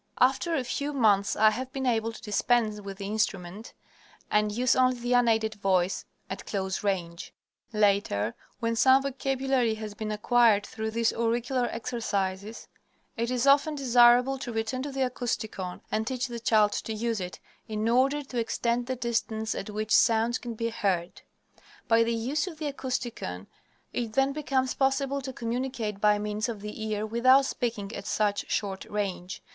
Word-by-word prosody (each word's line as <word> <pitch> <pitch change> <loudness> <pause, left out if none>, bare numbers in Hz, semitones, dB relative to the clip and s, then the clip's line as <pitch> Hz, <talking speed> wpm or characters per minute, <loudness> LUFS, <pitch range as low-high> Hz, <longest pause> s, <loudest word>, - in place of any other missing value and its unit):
After 270 +7 +3
a 270 - 0
few 285 +4 -3
months 205 -7 +3
I 215 0 +5
have 255 +4 -5
been 265 0 -3
able 225 -2 +1
to 225 - -12
dispense 215 0 +1
with 195 -1 -8
the 200 - -6
instrument 205 -1 -2 0.6
and 210 0 +2
use 250 +4 +2
only 255 -1 +3
the 245 +1 -1
unaided 225 -3 +3
voice 190 -3 0 0.2
at 190 - -7
close 190 -1 -2
range. 175 -3 -3 0.4
Later, 200 - +1 0.3
when 230 -1 0
some 265 +3 +5
vocabulary 270 -3 0
has 215 -1 -6
been 215 +1 -4
acquired 215 -1 +3
through 220 0 -4
these 230 +1 +1
auricular 240 +2 0
exercises, 215 -3 -3 0.5
it 235 0 -1
is 250 0 0
often 285 +2 +4
desirable 250 0 +5
to 245 - -5
return 225 +3 -2
to 285 +1 -4
the 270 0 -3
Acousticon 220 -7 -4
and 220 +1 -1
teach 255 -1 -1
the 240 -2 -5
child 215 -3 +3
to 220 - -3
use 225 -1 -2
it, 180 0 -6 0.3
in 215 0 -2
order 270 +5 +2
to 255 -3 -4
extend 235 +1 -1
the 260 - -1
distance 225 -2 -1
at 195 - -5
which 215 +1 -4
sounds 230 +1 +3
can 235 -2 -6
be 230 +1 -2
heard. 190 -6 -1 0.7
By 230 0 +5
the 230 0 0
use 270 +9 -1
of 330 -4 -7
the 300 -2 -3
Acousticon, 240 - -4 0.5
it 230 -3 -3
then 270 +3 +2
becomes 270 -3 0
possible 275 0 0
to 265 0 -5
communicate 235 -4 -3
by 210 0 +4
means 210 +2 -2
of 220 -4 -5
the 210 +1 -6
ear 215 0 -1
without 255 +5 +4
speaking 225 -5 -3
at - - -7
such 205 -2 0
short 195 -2 -2
range. 195 -3 -4
230 Hz, 170 wpm, -28 LUFS, 210-255 Hz, 0.7 s, I